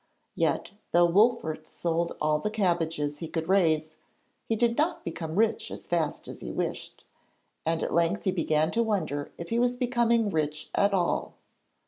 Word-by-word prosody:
Yet, - - 0 0.2
though 175 0 +6
Wolfert 170 -5 +2
sold 170 0 -2
all 150 0 +2
the 210 - -1
cabbages 165 -8 0
he 165 - -4
could 160 0 -3
raise, 160 -5 +3 0.6
he 225 - +1
did 235 +1 +2
not 325 +5 0
become 165 -1 -4
rich 220 +2 +1
as - - -8
fast 165 -3 -1
as - - -9
he - - -5
wished, - - -4 0.6
and 165 0 +1
at - - -2
length 170 +4 +2
he 190 - +2
began 155 -3 +1
to 230 - +1
wonder 165 -10 -1
if 170 - -7
he 230 - +1
was 245 0 +2
becoming 235 -3 +2
rich 155 -1 -2
at 200 0 +3
all. 180 -3 0
170 Hz, 170 wpm, -28 LUFS, 160-220 Hz, 0.6 s, though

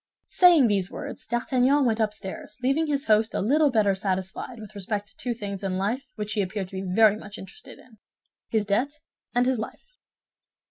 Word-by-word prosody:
Saying 345 -7 +6
these 200 -4 +1
words, - - -7
D'Artagnan 255 +4 +2
went 230 -2 +1
upstairs, 210 -1 -4
leaving 280 +5 +2
his 285 -1 -1
host 220 +1 +3
a - - +1
little 290 +8 +3
better 215 -5 +3
satisfied 190 +5 -3
with 215 -1 -10
respect 205 0 -4
to - - -23
two 245 -2 -3
things 200 -3 -6
in 190 -1 -1 0.4
which 210 0 -4
he 210 - +1
appeared 190 0 -3
to 190 0 -5
be 185 - -4
very 215 -2 +6
much 210 -1 -10
interested—his 220 - -8
debt 270 +9 -1 0.3
and 245 0 +4
his 255 -2 +1
life. - - -9
220 Hz, 175 wpm, -26 LUFS, 200-255 Hz, 0.4 s, Saying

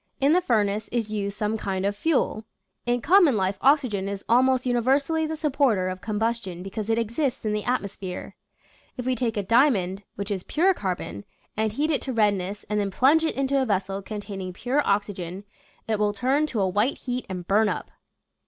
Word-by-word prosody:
In 280 +3 +4
the 360 - +4
furnace 215 - +1
is 230 -3 -1
used 200 -1 -3
some 215 +1 -1
kind 190 -1 -2
of 200 0 0
fuel. 255 -3 0 0.4
In 245 0 +1
common 335 - +5
life 190 0 -1
oxygen 255 -9 +2
is 200 -1 -6
al 240 +2 +5
most 260 0 +2
universally 275 +6 +1
the 315 - -3
supporter 265 - +1
of 185 0 -6
combustion 215 -4 -2
because 200 +3 -5
it 225 - +2
exists 235 +3 -1
in 215 - 0
the 210 -1 -1
atmosphere. 200 -6 -3 0.6
If 250 - -4
we 255 - +1
take 230 -2 -1
a 205 - 0
diamond, 200 -5 +3
which 200 +1 -5
is 195 -2 -1
pure 360 - +2
carbon, 180 - -4 0.3
and 220 0 0
heat 300 +6 0
it 295 - +1
to 260 - -4
redness 205 -3 0
and 210 0 0
then 200 -1 0
plunge 275 +10 +4
it 320 - 0
into 275 0 +1
a - - +1
vessel 195 -1 -1
containing 200 -3 -6
pure 250 +9 0
oxygen, 200 -2 -1 0.4
it 220 -2 0
will 210 -1 +2
turn 265 +8 +1
to 225 -8 -2
a 190 - +2
white 210 +8 +1
heat 250 0 -4
and 180 -2 -5
burn 210 +2 +3
up. - - -4
215 Hz, 200 wpm, -25 LUFS, 200-260 Hz, 0.6 s, common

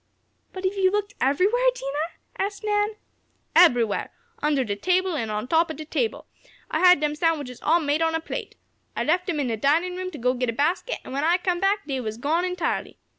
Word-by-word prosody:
"But 375 - -8
have 375 - +1
you 375 -1 +4
looked 410 +1 -2
everywhere, 390 - +2
Dinah?" 295 - -4 0.3
asked 405 +1 -11
Nan. 420 0 +1 0.6
"Eberywhere! 245 - +4 0.3
Under 290 -2 +2
de 205 -4 -3
table 365 - +1
an' 225 -7 -2
on 215 +2 -3
top 330 +4 +3
ob 315 - -5
de 310 - -7
table. 445 +8 -2 0.5
I - - 0
had 360 -3 +7
dem 300 0 0
sandwiches 300 -6 -1
all 330 +3 +3
made 300 0 0
an' 325 - +4
on 325 - -1
a - - +1
plate. 325 - -6 0.4
I - - -1
left 355 +3 +1
dem 330 -5 -1
in 285 - 0
de 230 -3 -2
dinin' 325 - +1
room 370 0 -3
to 325 - -9
go 250 0 +1
git 250 -1 -1
a - - -1
basket, 330 - 0
an' - - -8
when 275 +2 -2
I 340 +3 +4
come 355 -1 -1
back, 400 +2 +1
dey 270 -3 -2
was 220 -3 -4
gone 315 +8 0
entirely. 360 -2 -2
325 Hz, 225 wpm, -24 LUFS, 275-370 Hz, 0.6 s, had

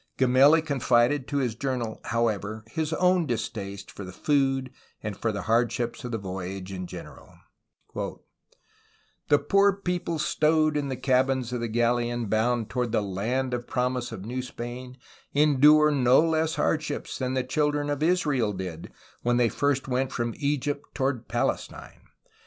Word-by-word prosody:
Gemelli 135 +5 +5
confided 135 -2 +2
to 145 - -2
his 125 -5 0
journal, 120 -2 -3
however, 110 -2 -1
his 160 +2 -2
own 180 -1 +2
distaste 100 -4 -4
for 100 - -8
the 95 - -8
food 135 +3 0 0.3
and 105 -2 -4
for 110 +2 -1
the 100 -3 -4
hardships 120 +1 0
of 125 - -5
the 115 - -1
voyage 95 -1 -6
in 90 -1 -5
general: - - -10 0.6
"The 145 - -5
poor 200 +5 +3
people 180 -3 -2
stow'd 155 0 +2
in 145 -1 0
the 130 - -2
cabbins 130 -1 +1
of 125 - -1
the 115 - -2
galeon 120 0 0
bound 115 +1 +1
towards 120 +2 -2
the 105 - +2
Land 120 +7 -2
of 120 0 -3
Promise 125 -1 -1
of 95 - -7
New 125 +3 -3
Spain, 125 +1 -7 0.4
endure 150 +1 +6
no 130 -3 +4
less 160 0 +1
hardships 155 -2 -1
than 130 0 -1
the 130 - +1
children 145 +2 0
of 145 0 -2
Israel 150 - +1
did, 90 -4 -6 0.3
when 120 0 +1
they 120 -3 +3 0.4
went 130 +1 0
from 120 -1 -2
Egypt 145 0 -1
towards 130 -4 -1
Palestine. - - -3
125 Hz, 150 wpm, -26 LUFS, 115-145 Hz, 0.6 s, endure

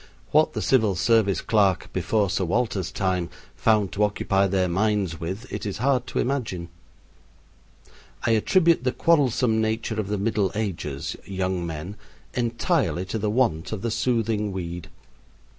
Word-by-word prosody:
What 155 +1 +4
the - - -3
civil 110 -7 +3
service 105 0 +2
clerk 100 -5 +1
before 105 -4 +1
Sir 100 - 0
Walter's 100 -1 -1
time 90 -3 -1 0.3
found 105 -3 +2
to 105 - 0
occupy 100 -1 +1
their 95 -1 +1
minds 95 -2 0
with 95 +8 -5
it - - -4
is 100 -1 -3
hard 130 +1 +1
to - - -5
imagine. 110 -10 -2 1.6
I 115 - +3
attribute 165 - +3
the 130 0 0
quarrelsome 125 -8 +2
nature 110 0 -1
of 105 - -2
the 105 +1 -1
Middle 100 -1 0
Ages 85 -10 -3
young 95 -2 -2
men 80 +6 -6 0.4
entirely 115 -6 0
to 110 +4 -3
the 105 0 0
want 105 -9 +1
of 110 -3 -4
the 115 - -1
soothing 110 -3 0
weed. 90 -2 -5
105 Hz, 150 wpm, -24 LUFS, 95-115 Hz, 1.6 s, What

